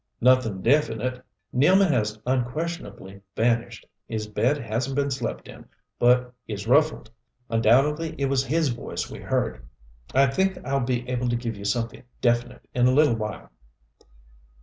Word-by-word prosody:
"Nothing 120 -6 +3
definite. 125 -2 +1 0.3
Nealman 180 +8 +4
has 110 -4 0
unquestionably 125 - -3
vanished. 115 0 0 0.2
His 110 -2 -3
bed 120 +7 +1
hasn't 120 +2 -3
been 140 0 0
slept 125 -3 -4
in, - - -12 0.3
but 125 0 +3
is 100 -2 -5
ruffled. 140 -2 +2 0.4
Undoubtedly 140 +8 +2
it 140 - 0
was 135 -1 +1
his 155 +3 +1
voice 120 -1 -5
we - - -8
heard. - - -2 0.5
I 135 +1 +6
think 190 +8 0
I'll 135 +1 0
be 125 -1 -2
able 125 -1 -1
to 120 - +1
give 115 -2 -3
you 100 0 -9
something 115 +3 -2 0.2
definite 120 +1 0
in 125 0 +3
a - - +4
little 145 -3 +4
while." 105 -5 -6
125 Hz, 150 wpm, -25 LUFS, 115-140 Hz, 0.5 s, I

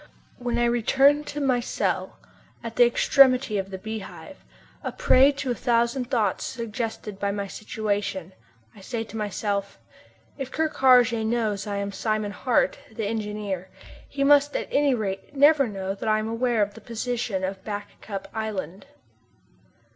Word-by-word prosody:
When 240 -1 -2
I 240 - +3
return 270 +5 +3
to 295 - -5
my 265 -3 +2
cell, 240 - -2 0.5
at 230 -1 -6
the 245 -1 +6
extremity 255 -3 +4
of 195 0 -4
the 190 - -6
Beehive, 220 0 -8 0.4
a - - -3
prey 280 - +5
to 275 -2 -3
a - - +2
thousand 240 +1 0
thoughts 220 -8 0
suggested 225 -3 -5
by 200 - 0
my 200 0 -2
situation, 200 -3 -3 0.4
I 200 - -14
say 225 +3 -4
to 225 - -12
myself: 205 -1 -2 0.6
"If 270 -1 -4
Ker 315 0 0
Karraje 250 -5 +4
knows 220 -3 -1
I 205 - -2
am 200 0 -2
Simon 215 0 -1
Hart, 245 +3 +1
the 220 -1 -4
engineer, 210 -3 -3 0.4
he 275 0 -1
must 290 +1 +5
at - - -2
any 280 -2 +3
rate 200 +4 -4
never 285 -1 +5
know 195 -2 -4
that 200 +2 -4
I 215 - +4
am 215 0 -2
aware 230 -1 +1
of 205 0 -4
the - - -13
position 230 -4 -3
of 190 0 -4
Back 205 -1 -7
Cup 195 -2 -6
Island." 210 - -4
225 Hz, 160 wpm, -25 LUFS, 205-250 Hz, 0.6 s, the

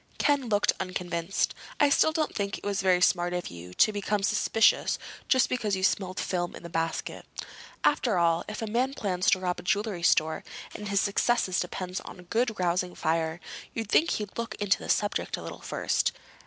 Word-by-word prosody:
Ken 285 -5 +2
looked 205 -1 +3
unconvinced. 180 -1 -1 0.3
"I 290 - +5
still 315 - +4
don't 310 -1 -1
think 200 0 -2
it - - -15
was 200 -1 -1
very 185 -1 +3
smart 175 -1 +3
of 180 -1 -3
you 85 +1 -10
to 215 - +4
become 205 0 -1
suspicious 215 +2 +3 0.3
just 260 -2 +4
because 215 -6 0
you 190 - -4
smelled 185 -1 +1
film 175 -1 -2
in - - -11
that 170 - -7
basket. 165 -1 -2 0.6
After 240 -8 +2
all, 170 -1 +3
if 215 +1 -5
a - - 0
man 250 +5 0
plans 185 0 0
to 185 - +4
rob 180 -1 -2
a - - -6
jewelry 205 -1 -1
store, 160 -2 +2 0.3
and 210 - -6
his 200 -1 +2
success 225 +3 +2
depends 180 +1 -3
on - - -11
a - - -11
good 225 +4 -1
rousing 180 0 0
fire, 160 +1 0 0.4
you'd 225 -2 -3
think 330 - +4
he'd 210 +1 -3
look 230 -2 -3
into 205 -2 +1
the - - -8
subject 205 -1 0
a - - -8
little - - -8
first. - - 0
195 Hz, 195 wpm, -28 LUFS, 180-215 Hz, 0.6 s, I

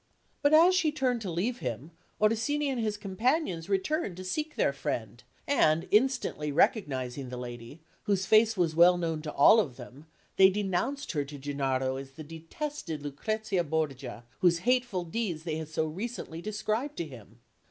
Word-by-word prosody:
But 285 - +3
as 335 +4 +7
she 355 -5 +2
turned 255 -5 0
to 200 - -4
leave 205 +9 -1
him, 125 +6 -5 0.3
Orsini 225 +8 +1
and 255 -3 -1
his 215 -2 -1
companions 205 - -1
returned 200 - -1
to 185 - -6
seek 305 +11 -3
their - - +2
friend; - - -4 0.2
and 165 - +3
instantly 210 - +1
recognising 135 - 0
the 125 - -6
lady, 120 +4 -8 0.2
whose 195 -2 +1
face 220 +1 +4
was 165 -3 +1
well 175 +2 +6
known 165 -3 -2
to 155 -1 -5
all 180 +10 +6
of 140 - -1
them, 135 +4 -12 0.3
they 190 0 +8
denounced 205 +8 -2
her 145 -4 -1
to 145 +1 -9
Gennaro 135 -2 -1
as 135 0 -9
the 155 +3 -9
detested 165 - -6
Lucrezia 195 +6 -2
Borgia, 140 -6 -3 0.2
whose 175 0 +2
hateful 245 -7 +1
deeds 175 -3 -3
they 160 -2 -3
had 160 -1 -5
so 160 0 -1
recently 170 0 -5
described 215 +7 -2
to 170 - -2
him. 115 -6 -13
175 Hz, 170 wpm, -29 LUFS, 150-225 Hz, 0.3 s, they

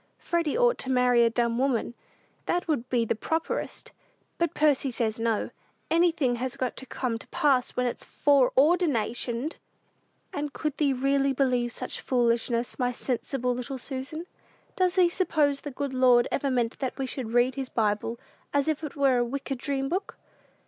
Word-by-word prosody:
Freddy 335 -4 -1
ought 485 -1 +3
to 260 - -3
marry 250 -2 +4
a 230 - +4
dumb 235 0 0
woman; 255 -3 0 0.5
that 355 0 0
would 260 -6 -1
be 240 -2 +2
properest; 320 +10 -3 0.5
but 340 -2 0
Percy 290 -3 +3
says 225 -2 -1
no 225 -2 0 0.4
anything 330 -7 +2
has 255 +1 -3
got 255 -1 -2
to 265 - -6
'come 235 -3 -2
to - - -13
pass' 265 -4 +1
when 250 - +2
it's 245 - -3
foreordinationed!" 275 - +2 0.8
"And 290 -1 -3
could 305 -2 -3
thee 290 -3 +2
really 275 +1 +1
believe 250 -3 +1
such - - -5
foolishness, 235 -1 0
my 250 -1 +1
sensible 250 0 -2
little 250 +2 -5
Susan? 275 +5 -5 0.5
Does 365 -1 +1
thee 365 -2 +5
suppose 310 -6 +1
the 290 - -5
good 280 0 -4
Lord 250 -2 +5
ever 280 0 0
meant 245 -3 0
that 260 -2 -3
we 270 - -1
should 250 -3 -4
read 245 +2 +3
his 265 -1 -4
Bible 220 +1 -1 0.4
as 285 0 +2
if 315 0 -1
it 300 - -5
were 270 -3 +3
a - - +3
wicked 270 +1 -4
dream 270 0 -1
book?" 370 +6 -3
260 Hz, 170 wpm, -27 LUFS, 240-290 Hz, 0.8 s, thee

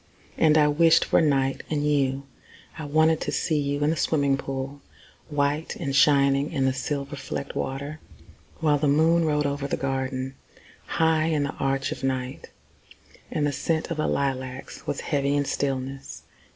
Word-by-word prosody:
And 155 -1 +4
I 150 -1 +5
wished 165 +2 +4
for - - +3
night 135 -3 +1
and 150 -1 0
you. 140 -2 +1 0.5
I 155 - -6
wanted 155 +2 +3
to - - -2
see 155 -3 0
you 145 0 -1
in 150 - +3
the - - 0
swimming 140 -4 +1
pool, 135 +1 -5 0.5
White 145 +1 -1
and 140 -5 -3
shining 140 0 +4
in 135 -5 0
the 130 - +2
silver 140 +1 -3
flecked 140 0 -6
water. 140 +3 -4 0.6
While 150 -2 +3
the 150 - +1
moon 160 +3 +4
rode 150 -1 +1
over 140 0 -2
the - - -2
garden, 130 -1 -2 0.5
High 160 -1 +2
in 155 -3 +1
the 140 - -3
arch 135 0 -1
of - - -6
night, 130 0 -3 0.8
And 150 - -1
the 145 - +1
scent 160 +4 -2
of 165 - -2
the 155 - 0
lilacs 130 -1 -3
was 145 - -2
heavy 140 -1 0
with 145 - +1
stillness. 135 -1 -3
140 Hz, 170 wpm, -25 LUFS, 135-155 Hz, 0.8 s, I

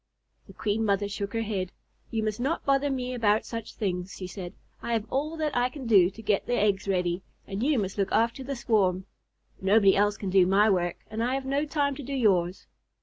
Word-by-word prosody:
The - - -13
Queen 215 +1 -1
Mother 205 -1 +1
shook 200 0 -4
her 225 0 0
head. 190 -4 -3 0.4
"You 225 -1 -1
must 215 +1 -2
not 275 +7 -1
bother 275 +1 +2
me 255 -2 -2
about 220 -3 +2
such 230 -2 -6
things," 180 -2 -3
she 185 - -6
said. 180 0 -7 0.3
"I 235 - -2
have 220 -2 0
all 300 +4 -1
that 305 -2 -1
I 245 0 +2
can 265 0 -8
do 195 -6 +6
to 200 +4 -12
get 205 -2 0
the 245 - +1
eggs 205 -2 +1
ready, 180 -2 0 0.2
and 195 +1 -5
you 285 +2 +2
must 195 -2 -2
look 195 -1 0
after 235 +4 +1
the 275 +1 -4
swarm. 190 -6 +1 0.6
Nobody 195 0 +5
else 205 0 +2
can 195 -3 -4
do 185 -1 +5
my 205 +3 +4
work, 175 -2 0
and 220 +1 -2
I 250 +2 0
have 270 0 -3
no 280 +3 0
time 285 -1 0
to - - -6
do 280 +1 -6
yours." 185 -7 +1
215 Hz, 225 wpm, -27 LUFS, 195-250 Hz, 0.6 s, do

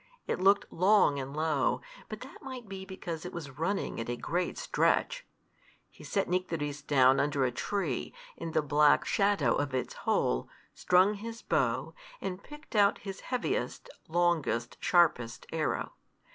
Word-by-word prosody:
It - - -2
looked 195 +1 +3
long 185 -5 +4
and 135 +2 -6
low, 155 -4 +1 0.3
but - - -7
that - - -11
might 260 -5 -8
be 190 -1 -7
because 175 -4 -6
it 180 - -6
was 145 -5 -8
running 195 -2 -1
at 115 - -4
a 120 - -1
great 175 +6 -2
stretch. - - +1 0.6
He - - -15
set 195 -2 -1
Nycteris 165 -5 -2
down 135 -2 +4
under 145 -2 +1
a 125 - 0
tree, 160 - -2 0.2
in 165 -1 -6
the 155 - +2
black 145 +1 +4
shadow 195 - +2
of 145 -2 -1
its 130 - -2
hole, - - 0 0.2
strung 185 +3 +4
his 225 +2 -7
bow, - - 0 0.3
and 185 0 -4
picked 295 -2 -12
out 205 -1 +5
his 195 -1 -5
heaviest, 390 - -3 0.2
longest, 160 -8 +1
sharpest 135 -10 +2
arrow. 160 -1 -1
170 Hz, 155 wpm, -30 LUFS, 145-200 Hz, 0.6 s, out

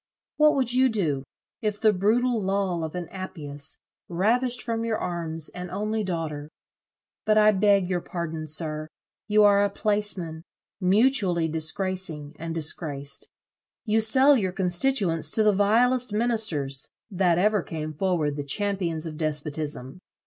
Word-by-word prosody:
What 300 0 +5
would 255 -3 +1
you 260 +1 +4
do, 160 - -1 0.4
if 210 -1 -2
the 215 -2 +4
brutal 225 +5 +1
lull 190 -3 -1
of 160 +2 -5
an 175 -2 -4
Appius 150 -7 -5 0.3
ravished 235 +8 +1
from 230 -1 -2
your 225 -1 -1
arms 165 -3 -4
an 180 0 -7
only 215 +2 -2
daughter? 160 -5 -4 0.7
But 215 0 +2
I 215 0 +6
beg 200 -2 +3
your 180 -1 -1
pardon, 160 -3 -5
sir. 155 0 -2 0.4
You 210 0 +4
are 200 -1 +5
a 205 - +2
placeman, 200 -6 -2 0.4
mutually 195 -3 +3
disgracing 160 -1 -1
and 165 0 -5
disgraced. 145 -3 -2 0.6
You 220 0 +2
sell 260 +6 +5
your 190 -7 -1
constituents 180 - +1
to 220 - +3
the 210 -1 +4
vilest 235 +4 +3
ministers, 210 - -1 0.2
that 180 -3 +2
ever 210 +2 +2
came 155 -2 -5
forward 155 -3 -1
the 145 - -3
champions 170 0 -1
of 155 -2 -6
despotism. 150 -2 -4
185 Hz, 140 wpm, -25 LUFS, 160-215 Hz, 0.7 s, I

